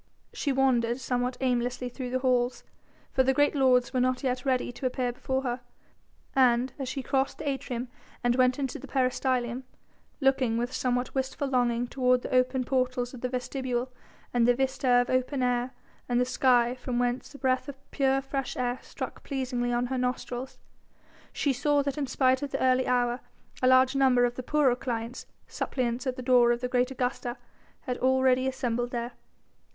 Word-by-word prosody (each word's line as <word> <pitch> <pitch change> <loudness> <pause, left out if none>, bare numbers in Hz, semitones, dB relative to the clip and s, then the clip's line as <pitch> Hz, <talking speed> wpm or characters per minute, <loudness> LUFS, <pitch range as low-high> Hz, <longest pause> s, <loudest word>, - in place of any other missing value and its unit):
She 285 - -1
wandered 250 -3 +2
somewhat 250 -1 -1
aimlessly 250 0 0
through 250 +1 -6
the 255 - 0
halls, 250 -1 +1 0.5
for 265 - +3
the 265 0 +2
great 290 +1 +3
lords 255 -3 +3
were 255 - +1
not 255 +1 +1
yet 255 -1 -1
ready 255 -2 +1
to 255 +2 -3
appear 250 -1 -1
before 265 +2 -2
her, 250 -1 -2 0.7
and 255 -1 +3
as 265 -2 -3
she 270 0 -4
crossed 270 +1 0
the 305 - -6
atrium 260 -3 -3 0.4
and 240 0 +3
went 255 0 +3
into 270 -3 -3
the 275 - -10
peristylium, 255 -2 0 0.6
looking 265 -4 +2
with 240 +2 -2
somewhat 250 -1 -1
wistful 265 +1 -2
longing 245 -2 +1
toward 250 0 +1
the - - -5
open 255 +1 +2
portals 250 -1 -1
of 250 - -9
the 250 - -1
vestibule 255 0 -3 0.4
and 240 -1 +3
the 245 - +5
vista 265 0 0
of 245 0 +4
open 255 +1 0
air 245 0 +1 0.4
and 245 0 +2
sky 245 -2 +3
from 250 -1 -4
whence 245 +3 -1
a - - -8
breath 260 0 0
of 280 - -6 0.2
pure 270 0 +1
fresh 270 -1 -3
air 245 0 -1
struck - - -7
pleasingly 250 -3 -2
on 240 0 +1
her 260 +1 -2
nostrils, 250 +1 -3 0.7
she 280 - 0
saw 285 +2 +2
that 280 +1 -3
in 280 - -1
spite 260 0 +2
of 285 - -3
the - - -3
early 260 0 +3
hour 245 0 +1 0.4
a 255 - +3
large 260 +1 +5
number 260 -3 +4
of 240 - -1
the 255 - -5
poorer 275 -1 +2
clients, 235 -1 -4 0.2
suppliants 250 0 -2
at 255 - -1
the 255 - -7
door 245 -1 +5
of 240 - 0
the 250 - -1
great 250 0 +1
Augusta, 250 -1 -3 0.4
had 250 -3 -4
already 260 0 +3
assembled 245 -2 -1
there. 240 0 -3
255 Hz, 185 wpm, -28 LUFS, 245-265 Hz, 0.7 s, the